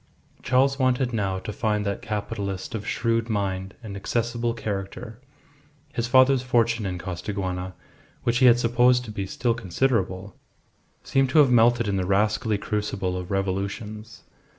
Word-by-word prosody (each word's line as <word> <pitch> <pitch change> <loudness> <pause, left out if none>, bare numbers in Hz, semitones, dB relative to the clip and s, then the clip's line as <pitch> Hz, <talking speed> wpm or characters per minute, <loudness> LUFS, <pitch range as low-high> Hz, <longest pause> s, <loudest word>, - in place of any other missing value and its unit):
Charles 135 +2 +2
wanted 130 -1 +1
now 100 -4 -1
to 105 +3 -6
find 105 -2 -1
that 100 0 -2
capitalist 100 -2 -4
of 110 -2 -5
shrewd 115 0 0
mind 95 -2 -2
and 105 -3 -7
accessible 115 +3 -1
character. 105 +1 -5 0.7
His 120 0 -1
father's 130 +1 +5
fortune 115 -4 +1
in 90 -1 -3
Costaguana, 95 0 -4 0.5
which 120 0 +1
he 130 - +6
had 120 -1 +7
supposed 125 +1 +3
to 110 - -7
be 100 -2 -4
still 120 +4 0
considerable, 100 -3 -1 0.7
seemed 135 0 +1
to 145 - +1
have 145 -4 +6
melted 120 -1 +4
in 100 -1 0
the 90 -1 -1
rascally 105 +2 +1
crucible 100 -3 -2
of 90 -1 -5
revolutions. 100 +3 -4
110 Hz, 150 wpm, -25 LUFS, 100-120 Hz, 0.7 s, had